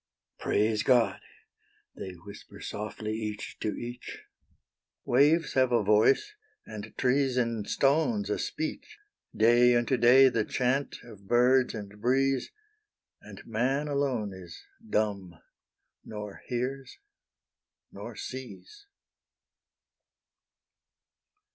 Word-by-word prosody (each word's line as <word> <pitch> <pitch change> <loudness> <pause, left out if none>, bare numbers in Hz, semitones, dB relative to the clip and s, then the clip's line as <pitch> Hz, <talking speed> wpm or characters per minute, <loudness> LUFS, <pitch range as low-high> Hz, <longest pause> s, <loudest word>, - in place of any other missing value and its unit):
Praise 105 +1 +1
God! 115 -6 +3 0.8
they 95 - -7
whisper 100 +4 -13
softly 105 +1 -5
each 105 -1 -5
to 105 - -3
each; 120 +1 -8 0.8
Waves 150 +5 +3
have 130 -1 +3
a 120 -3 +3
voice, 110 - +3 0.3
and 110 0 -9
trees 130 0 +1
and 115 -4 -1
stones 160 - +1
a - - -1
speech; - - -5 0.4
Day 120 +2 +5
unto 120 +2 +1
day 125 +3 +7
the 115 -3 0
chant 130 +4 -1
of 100 -5 -14
birds 125 +2 +3
and 105 -1 -9
breeze, 135 +2 +1 0.7
And - - -12
man 130 +6 -1
alone 135 -8 -1
is 90 -3 -11 0.3
dumb, 100 -5 -1 0.7
nor 105 -2 -8
hears, 130 +1 -4 0.9
nor - - -9
sees. 405 - -9
120 Hz, 100 wpm, -28 LUFS, 105-135 Hz, 0.9 s, day